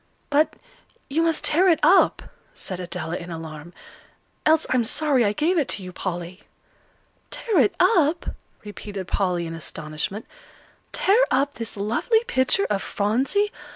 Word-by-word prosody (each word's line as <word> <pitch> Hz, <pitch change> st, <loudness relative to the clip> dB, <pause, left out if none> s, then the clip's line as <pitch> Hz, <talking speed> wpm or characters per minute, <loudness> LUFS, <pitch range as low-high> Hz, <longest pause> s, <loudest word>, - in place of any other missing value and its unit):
"But, 300 Hz, +2 st, +3 dB, 0.6 s
you 315 Hz, +4 st, +2 dB
must 330 Hz, -1 st, +1 dB
tear 345 Hz, +5 st, +3 dB
it 335 Hz, -3 st, +4 dB
up," 385 Hz, -, +5 dB, 0.3 s
said 185 Hz, -3 st, -5 dB
Adela, 175 Hz, -2 st, -4 dB
in 175 Hz, -, -8 dB
alarm, 160 Hz, -1 st, -8 dB, 0.8 s
"else 315 Hz, 0 st, +4 dB
I'm 255 Hz, -2 st, +3 dB
sorry 275 Hz, +1 st, +1 dB
I 205 Hz, -, +2 dB
gave 325 Hz, -, +1 dB
it 280 Hz, -, 0 dB
to 195 Hz, -, -3 dB
you, 180 Hz, 0 st, -8 dB
Polly." 175 Hz, 0 st, -5 dB, 0.9 s
"Tear 435 Hz, -8 st, 0 dB
it 225 Hz, -6 st, +3 dB
up!" 345 Hz, -4 st, +3 dB, 0.3 s
repeated 205 Hz, -2 st, -7 dB
Polly, 180 Hz, -3 st, 0 dB
in 165 Hz, -, -6 dB
astonishment; 160 Hz, +5 st, -5 dB, 0.7 s
"tear 430 Hz, +6 st, +3 dB
up 275 Hz, +2 st, +1 dB
this 230 Hz, -2 st, -6 dB
lovely 235 Hz, -, +1 dB
picture 325 Hz, -, +1 dB
of 200 Hz, -2 st, -1 dB
Phronsie! 265 Hz, -, 0 dB
230 Hz, 145 wpm, -23 LUFS, -, 0.9 s, up